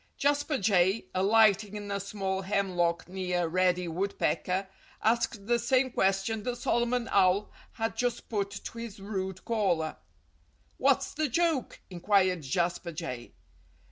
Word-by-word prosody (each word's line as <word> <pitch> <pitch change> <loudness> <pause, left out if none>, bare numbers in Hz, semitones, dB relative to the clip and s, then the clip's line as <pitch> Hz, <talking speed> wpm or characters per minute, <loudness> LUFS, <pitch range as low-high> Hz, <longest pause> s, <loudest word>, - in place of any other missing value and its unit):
Jasper 290 +1 +1
Jay, 190 0 +2
alighting 210 +1 +4
in 205 -1 -6
a 200 - -1
small 195 -1 -3
hemlock 185 -3 0
near 180 -2 -1
Reddy 180 +1 +1
Woodpecker, 190 +1 -1 0.3
asked 225 -2 0
the 240 +2 +2
same 255 +2 +2
question 195 +2 +1
that 245 +3 -3
Solomon 240 0 0
Owl 195 +1 +3 0.2
had 225 0 -2
just 245 -1 -2
put 200 -3 -1
to 205 +3 -8
his 230 -4 -7
rude 190 -2 -4
caller. 185 -9 0 0.8
"What's - - +2
the 310 -2 -1
joke?" 320 0 0
inquired 185 -1 +2
Jasper 170 +4 -1
Jay. 140 -8 -6
200 Hz, 130 wpm, -29 LUFS, 185-230 Hz, 0.8 s, alighting